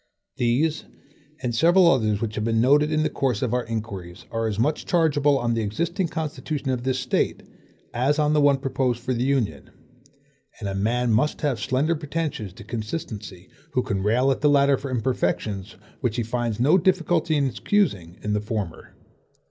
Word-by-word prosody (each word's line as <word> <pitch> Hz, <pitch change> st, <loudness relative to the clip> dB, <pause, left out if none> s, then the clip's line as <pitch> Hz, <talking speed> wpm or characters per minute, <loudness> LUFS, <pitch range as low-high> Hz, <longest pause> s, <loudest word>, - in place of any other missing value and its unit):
These 135 Hz, +7 st, +1 dB, 0.6 s
and 120 Hz, -1 st, -1 dB
several 175 Hz, +8 st, +5 dB
others 110 Hz, -8 st, +2 dB
which 110 Hz, -2 st, -2 dB
have 105 Hz, -, -2 dB
been 115 Hz, 0 st, +1 dB
noted 145 Hz, +5 st, +4 dB
in 155 Hz, 0 st, +2 dB
the -, -, +2 dB
course 125 Hz, -6 st, 0 dB
of 120 Hz, -, -1 dB
our 125 Hz, 0 st, +1 dB
inquiries 105 Hz, -6 st, -6 dB
are 115 Hz, -1 st, -1 dB
as 105 Hz, -2 st, -3 dB
much 145 Hz, +7 st, 0 dB
chargeable 145 Hz, -4 st, +3 dB
on 120 Hz, -2 st, 0 dB
the 115 Hz, -, 0 dB
existing 170 Hz, -, -1 dB
constitution 155 Hz, -3 st, -3 dB
of 125 Hz, -2 st, -1 dB
this 130 Hz, 0 st, 0 dB
State, 125 Hz, 0 st, -1 dB, 0.5 s
as 135 Hz, +5 st, +1 dB
on 150 Hz, 0 st, +2 dB
the 150 Hz, -, +3 dB
one 145 Hz, -1 st, +5 dB
proposed 130 Hz, -2 st, -1 dB
for 130 Hz, +1 st, -2 dB
the 120 Hz, -, -2 dB
Union; 125 Hz, -, 0 dB, 0.9 s
and 105 Hz, -, -4 dB
a 100 Hz, -, -2 dB
man 115 Hz, +5 st, 0 dB
must 135 Hz, +8 st, +1 dB
have 140 Hz, -7 st, 0 dB
slender 135 Hz, +9 st, +1 dB
pretensions 150 Hz, -, -3 dB
to 110 Hz, -, -12 dB
consistency, 105 Hz, -, -6 dB, 0.3 s
who 125 Hz, -, +1 dB
can 100 Hz, -3 st, -2 dB
rail 120 Hz, +7 st, +2 dB
at 135 Hz, -, -2 dB
the 150 Hz, -, +4 dB
latter 140 Hz, -1 st, +4 dB
for 135 Hz, +1 st, -6 dB
imperfections 110 Hz, -4 st, -2 dB, 0.2 s
which 120 Hz, -5 st, -1 dB
he 120 Hz, -, 0 dB
finds 115 Hz, -1 st, -2 dB
no 150 Hz, +10 st, +5 dB
difficulty 170 Hz, -3 st, +1 dB
in 145 Hz, -2 st, +2 dB
excusing 115 Hz, -, 0 dB
in 105 Hz, -, -1 dB
the 105 Hz, -, 0 dB
former. 105 Hz, -6 st, -5 dB
125 Hz, 185 wpm, -24 LUFS, 110-150 Hz, 0.9 s, several